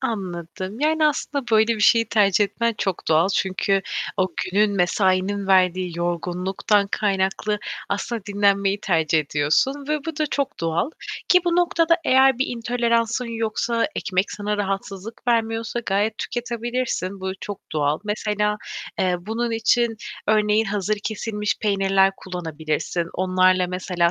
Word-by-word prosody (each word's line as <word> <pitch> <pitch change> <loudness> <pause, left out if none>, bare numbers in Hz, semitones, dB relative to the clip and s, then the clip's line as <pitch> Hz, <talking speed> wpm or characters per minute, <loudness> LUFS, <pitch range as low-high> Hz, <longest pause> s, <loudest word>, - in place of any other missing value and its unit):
Anladım. 190 -2 -4
Yani, 310 +1 +3
aslında 285 -2 -1
böyle 220 +1 +4
bir - - -6
şeyi 230 +1 +4
tercih 205 -2 +4
etmen 235 +3 -1
çok 190 -3 -2
doğal. 160 +3 +4
Çünkü 195 +1 +1 0.3
o 185 -2 +2 0.2
günün, 205 +2 +1
mesainin 190 +2 +1
verdiği 185 -2 +2
yorgunluktan 180 +4 0
kaynaklı 200 +1 0 0.3
aslında 210 +2 -3
dinlenmeyi 200 0 +1
tercih 160 -5 +2
ediyorsun 155 - +1
ve 305 0 +1
bu 325 -2 -5
da 305 - +1
çok 280 -1 -2
doğal 165 - 0 0.4
ki 360 - +6
bu 345 -1 +1
noktada 335 -1 +3
eğer 265 -2 +5
bir 265 - +1
intoleransın 235 0 0
yoksa, 230 0 -1
ekmek 190 -2 -1
sana 210 0 -2
rahatsızlık 195 +3 -4
vermiyorsa 225 0 0
gayet 205 +2 0
tüketebilirsin. 240 -5 -3
Bu 190 0 -3
çok 205 -1 -6
doğal. 150 0 +1
Mesela, 210 0 -1 0.4
eee, 180 -1 +2
bunun 225 +5 -2
için 225 +1 +2 0.3
örneğin 215 0 +3
hazır 205 0 -1
kesilmiş 210 -1 -2
peynirler 195 -1 +3
kullanabilirsin. 165 -1 -3
Onlarla 185 0 +3
mesela 180 -1 0
205 Hz, 130 wpm, -23 LUFS, 185-230 Hz, 0.4 s, ki